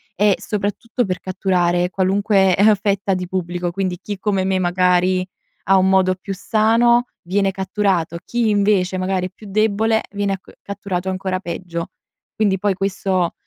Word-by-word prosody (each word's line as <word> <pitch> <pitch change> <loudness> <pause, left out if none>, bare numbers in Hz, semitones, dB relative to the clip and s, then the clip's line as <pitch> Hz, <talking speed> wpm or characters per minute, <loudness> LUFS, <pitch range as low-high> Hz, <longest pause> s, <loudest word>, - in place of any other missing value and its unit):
e 205 0 +3
soprattutto 210 +3 -2
per 185 -1 -3
catturare 180 -2 0
qualunque 195 0 +2
eh, 210 +2 +5
fetta 200 -1 0
di 180 -1 -4
pubblico. 175 -1 -3
Quindi 185 -1 -2
chi 205 -1 -6
come 195 -2 0
me, 190 0 0
magari 180 +1 +2 0.4
ha 195 - +6
un 190 0 +3
modo 190 -1 +3
più 195 +1 -6
sano, 230 +4 +3 0.2
viene 195 +2 +1
catturato. 190 -3 -1
Chi 235 -2 0
invece 200 -3 +2
magari 185 0 -1
è - - -15
più 210 +2 -14
debole 220 +2 +2
viene 200 -1 -1 0.2
catturato 190 -2 -4
ancora 185 0 -2
peggio. 170 -2 -5 0.4
Quindi 200 -3 +1
poi 205 -1 +1
questo 190 -2 -1
190 Hz, 150 wpm, -20 LUFS, 185-205 Hz, 0.4 s, ha